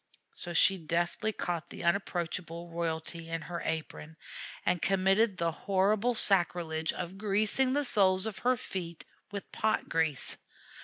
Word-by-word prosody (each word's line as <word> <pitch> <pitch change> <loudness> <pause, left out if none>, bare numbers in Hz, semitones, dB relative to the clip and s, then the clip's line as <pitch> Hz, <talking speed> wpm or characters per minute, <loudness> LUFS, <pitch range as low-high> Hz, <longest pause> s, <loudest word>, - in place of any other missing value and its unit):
So 175 - 0
she 190 +3 +4
deftly 175 +6 -1
caught 175 -4 -3
the - - -8
unapproachable 170 -1 -2
royalty 165 0 -3
in 165 0 -2
her 170 +2 -5
apron, 160 0 -4 0.5
and 175 - +1
committed 195 +2 +3
the 170 -1 +1
horrible 200 +7 +1
sacrilege 170 -5 +2
of 180 +2 -6
greasing 215 +5 +2
the 290 0 +1
soles 190 -5 +4
of 220 -3 -4
her 250 +1 +2
feet 170 -6 -6 0.3
with 200 -1 -6
pot 220 0 0
grease. 160 -4 0
180 Hz, 140 wpm, -31 LUFS, 165-200 Hz, 0.5 s, she